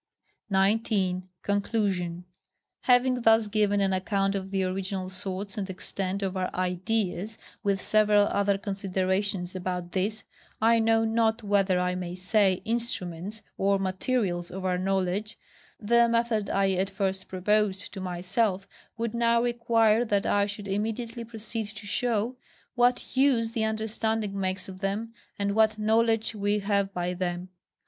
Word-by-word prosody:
19. 195 -2 +1
Conclusion. 195 -4 -1 0.6
Having 250 0 +4
thus 225 -1 +5
given 205 -1 +1
an 195 -1 +2
account 195 +1 0
of 195 -1 -3
the 195 -1 0
original, 185 0 -3
sorts, 190 +2 -4
and 195 -1 -3
extent 190 +1 -3
of 190 -1 -2
our 185 -1 -1
IDEAS, 190 +3 -1 0.2
with 200 -2 +1
several 210 -1 +4
other 200 0 +2
considerations 195 -1 -1
about 180 -1 -3
these 205 +4 -1 0.4
(I 230 +1 +4
know 225 0 +3
not 225 0 +1
whether 195 -3 +2
I 180 0 0
may 180 -1 -4
say) 190 0 +2
instruments, 210 -4 -2 0.2
or 195 0 +3
materials 190 -2 -1
of 190 +1 -6
our 180 -1 +1
knowledge, 195 +2 -1 0.4
the 235 +2 +4
method 230 -3 +1
I 195 0 +2
at 190 +1 0
first 190 -1 -2
proposed 200 +1 0
to 195 - -6
myself 185 +2 -1 0.3
would 230 -1 -2
now 235 0 +3
require 230 -2 +3
that 205 -4 0
I 205 0 +2
should 205 0 -6
immediately 225 +4 -3
proceed 225 -1 -5
to 205 0 -9
show, 230 +3 -1 0.4
what 245 +1 +1
use 260 -4 +3
the 225 -2 0
understanding 220 -1 -1
makes 190 0 -2
of 190 -1 -9
them, 210 +4 -2 0.2
and 200 0 0
what 220 0 +3
KNOWLEDGE 225 +1 +2
we 205 0 0
have 200 -1 0
by 180 -1 -2
them. 180 0 -3
200 Hz, 145 wpm, -27 LUFS, 190-225 Hz, 0.6 s, thus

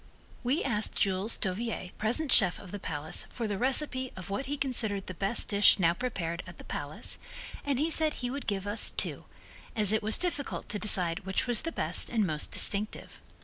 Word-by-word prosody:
We 260 +6 0
asked 220 -5 0
Jules 195 +3 +1
Dauviller, 215 +4 -2
the - - -20
present 245 +8 -1
chef 180 -4 +6
of 185 - -12
the 205 - -6
Palace, 160 -1 -2
for 235 -3 -4
the 200 -2 -3
recipe 260 0 +2
of 185 +1 -9
what 260 +7 -3
he 290 +1 -3
considered 230 -8 0
the 185 - -7
best 195 +6 +1
dish 205 0 +5
now 170 -3 +3
prepared 175 -7 -4
at - - -11
the - - -12
Palace - - -4 0.4
and 280 -3 -1
he 310 +4 0
said 310 -1 +2
he 245 -1 -4
would 280 +1 -6
give 195 -2 -2
us 205 +2 +1
two, - - -3 0.5
as 210 -3 +4
it 220 0 +1
was 215 +1 +2
difficult 335 -6 -3
to 210 - -3
decide 180 -6 +1
which 190 +1 -1
was 240 -3 +2
the 330 - -4
best - - +3
and 225 -4 +1
most 155 -4 -3
distinctive. 210 +1 +1
215 Hz, 205 wpm, -29 LUFS, 190-255 Hz, 0.5 s, chef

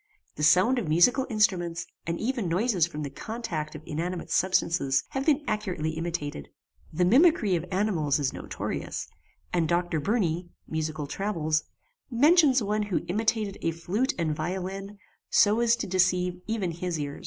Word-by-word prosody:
The - - -6
sound 185 +12 +5
of 205 - -4
musical 210 - +4
instruments, 180 -7 +1 0.2
and 170 0 -2
even 230 -5 -1
noises 185 -1 +2
from 150 -3 -6
the 140 - -5
contact 165 - -5
of 155 - -9
inanimate 170 +3 -4
substances, 170 -7 +2
have 270 +2 -3
been 300 -1 +3
accurately 185 -7 -2
imitated. 160 - -4 0.4
The 175 +3 +1
mimicry 245 - +4
of 170 0 -2
animals 185 -8 +1
is 140 -3 -1
notorious; - - -5 0.5
and 170 -3 +1
Dr. 175 -2 +1
Burney 175 -2 0 0.2
(Musical 155 -1 -3
Travels) 160 -3 -1 0.4
mentions 275 0 +5
one 210 +1 0
who 185 - -1
imitated 215 0 0
a - - +1
flute 195 - -1
and 160 -3 0
violin, 190 +5 -4 0.3
so 210 +2 +4
as 235 0 +4
to - - -4
deceive 180 -1 +1
even 215 -6 -1
his 170 0 -3
ears. 145 -1 -4
180 Hz, 155 wpm, -27 LUFS, 160-215 Hz, 0.5 s, sound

